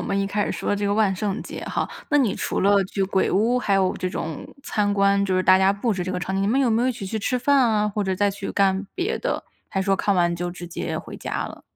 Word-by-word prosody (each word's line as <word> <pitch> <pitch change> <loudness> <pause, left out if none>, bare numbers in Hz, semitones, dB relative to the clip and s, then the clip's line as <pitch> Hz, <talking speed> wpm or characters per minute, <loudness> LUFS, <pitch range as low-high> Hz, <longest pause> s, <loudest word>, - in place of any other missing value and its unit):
我 - - -3
们 195 - -1
一 195 - +1
开 205 +1 0
始 - - -2
说 - - -1
这 205 0 -1
个 200 - +1
万 210 -3 +2
圣 200 +2 -2
节 - - -8
哈。 - - -2 0.2
那 290 - +4
你 235 -8 +2
除 - - -2
了 200 0 +4
去 195 +1 -3
鬼 190 0 +1
屋， 225 +6 +2
还 200 -5 +1
有 190 -1 +2
这 185 - -2
种 160 -3 -5 0.2
参 205 -1 0
观， 200 0 +3
就 185 -1 0
是 185 - +2
大 185 0 +6
家 190 +1 +4
布 215 +3 -1
置 180 -2 -3
这 185 - -3
个 180 - -2
场 190 - -3
景， 195 - 0
你 - - +1
们 260 +6 +2
有 250 -4 +2
没 225 +1 +2
有 255 - +2
一 255 - +1
起 200 - -7
去 220 +3 -3
吃 250 +5 0
饭 280 +3 +3
啊？ 215 -4 +3
或 205 0 -2
者 190 0 0
再 200 +1 +2
去 195 0 -6
干 195 0 +2
别 390 +5 -1
的？ - - -2 0.3
还 195 - -1
说 195 0 +2
看 200 0 +1
完 175 -1 +2
就 175 +1 -3
直 175 0 -8
接 - - -4
回 - - -7
家 - - -3
了？ - - -11
200 Hz, 320 characters per minute, -23 LUFS, 190-215 Hz, 0.3 s, 大